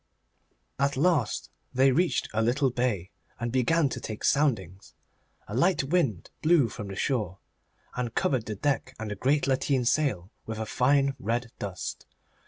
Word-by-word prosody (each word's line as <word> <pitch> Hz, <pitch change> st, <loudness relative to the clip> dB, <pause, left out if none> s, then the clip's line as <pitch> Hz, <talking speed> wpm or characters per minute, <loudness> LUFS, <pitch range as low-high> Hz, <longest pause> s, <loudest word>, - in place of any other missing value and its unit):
At 140 Hz, 0 st, +1 dB
last 145 Hz, -7 st, +1 dB, 0.2 s
they 135 Hz, +1 st, +5 dB
reached 175 Hz, +6 st, +1 dB
a 110 Hz, -, +1 dB
little 130 Hz, +4 st, +2 dB
bay, 115 Hz, -7 st, -1 dB, 0.3 s
and 120 Hz, 0 st, -2 dB
began 140 Hz, +5 st, +3 dB
to 130 Hz, -, -4 dB
take 110 Hz, -2 st, -6 dB
soundings. 100 Hz, -, 0 dB, 0.5 s
A 105 Hz, -, -7 dB
light 175 Hz, +5 st, +3 dB
wind 135 Hz, -, 0 dB
blew 155 Hz, -7 st, +4 dB
from 105 Hz, +1 st, -7 dB
the 95 Hz, -, -6 dB
shore, 105 Hz, -5 st, -1 dB, 0.6 s
and 120 Hz, -2 st, -3 dB
covered 130 Hz, -5 st, +1 dB
the 105 Hz, -, -3 dB
deck 135 Hz, +5 st, -1 dB
and 110 Hz, -1 st, -5 dB
the -, -, -3 dB
great 140 Hz, +8 st, +2 dB
lateen 135 Hz, -1 st, +1 dB
sail 115 Hz, -, +1 dB, 0.2 s
with 110 Hz, 0 st, -4 dB
a 110 Hz, -, -3 dB
fine 135 Hz, +4 st, +2 dB
red 120 Hz, -1 st, -2 dB
dust. 95 Hz, -3 st, -5 dB
125 Hz, 160 wpm, -28 LUFS, 110-140 Hz, 0.6 s, they